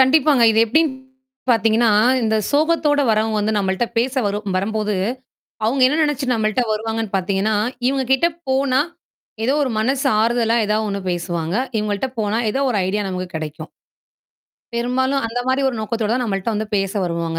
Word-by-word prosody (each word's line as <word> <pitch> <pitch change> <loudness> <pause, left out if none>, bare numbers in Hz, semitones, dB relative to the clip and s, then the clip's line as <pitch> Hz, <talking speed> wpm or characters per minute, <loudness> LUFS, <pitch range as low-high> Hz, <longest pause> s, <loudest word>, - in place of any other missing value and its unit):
கண்டிப்பாங்க. 275 0 +4
இது 220 - +1
எப்படீன்னு 300 +3 +2 0.5
பார்த்தீங்கன்னா, 225 0 +3 0.3
இந்த 220 -1 +1
சோகத்தோட 300 -1 +2
வரவங்க 220 0 +1
வந்து 215 +1 0
நம்மள்ட்ட 190 +3 0
பேச 255 +3 0
வரும் 205 -1 -3
வரும்போது 210 +2 -1 0.7
அவுங்க 260 +4 +1
என்ன 295 - 0
நெனைச்சு 295 -3 -1
நம்மள்ட்ட 215 +1 0
வருவாங்கன்னு 220 -1 -3
பார்த்தீங்கன்னா, 195 +3 0 0.3
இவங்க 270 0 +1
கிட்ட 265 +6 +3 0.2
போனா, 265 0 +2 0.6
எதோ 255 +4 +2
ஒரு 260 - -2
மனசு 265 +5 0 0.2
ஆறுதலா 230 0 +2
ஏதாவது 215 +1 0
ஒண்ணு 200 0 -3
பேசுவாங்க. 170 -1 -3 0.2
இவங்கள்ட்ட 210 +2 -1
போனா 210 +1 0
எதோ 270 - -1
ஒரு 225 - 0
ஐடியா 205 +3 -1
நமக்குக் 185 -1 -5
கெடைக்கும். 155 0 -6 1.1
பெரும்பாலும் 260 +3 0
அந்த 230 +2 -4
மாரி 260 +1 +1
ஒரு 260 - -3
நோக்கத்தோட 220 0 -2
தான் 250 - 0
நம்மள்ட்ட 200 0 -2
வந்து 215 +1 -2
பேச 195 -1 -1
வருவாங்க. 170 -1 -2
220 Hz, 155 wpm, -20 LUFS, 200-260 Hz, 1.1 s, கண்டிப்பாங்க